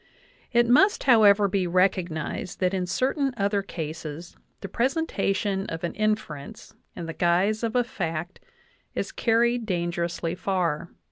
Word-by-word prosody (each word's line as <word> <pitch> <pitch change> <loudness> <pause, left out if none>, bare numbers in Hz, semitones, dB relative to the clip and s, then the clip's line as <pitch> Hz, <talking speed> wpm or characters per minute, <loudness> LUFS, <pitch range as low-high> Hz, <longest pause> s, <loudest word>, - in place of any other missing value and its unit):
It 240 -1 +4
must, 340 - +4
however, 210 -5 +6
be 190 -2 0
recognized 180 -3 0
that 185 0 +1
in 185 -2 -1
certain 265 - 0
other 200 0 +1
cases 160 -2 -7 0.3
the 195 - -5
presentation 205 - -1
of 165 +1 -6
an 170 - -2
inference 210 -10 -3 0.2
in 170 - -6
the 165 - -5
guise 180 +6 +2
of 230 0 -2
a 245 - +4
fact 175 -7 -4 0.6
is - - -2
car 230 -1 +2
ried 235 -1 +1
dangerously 170 -2 -2
far. 175 -4 -1
190 Hz, 140 wpm, -26 LUFS, 170-225 Hz, 0.6 s, however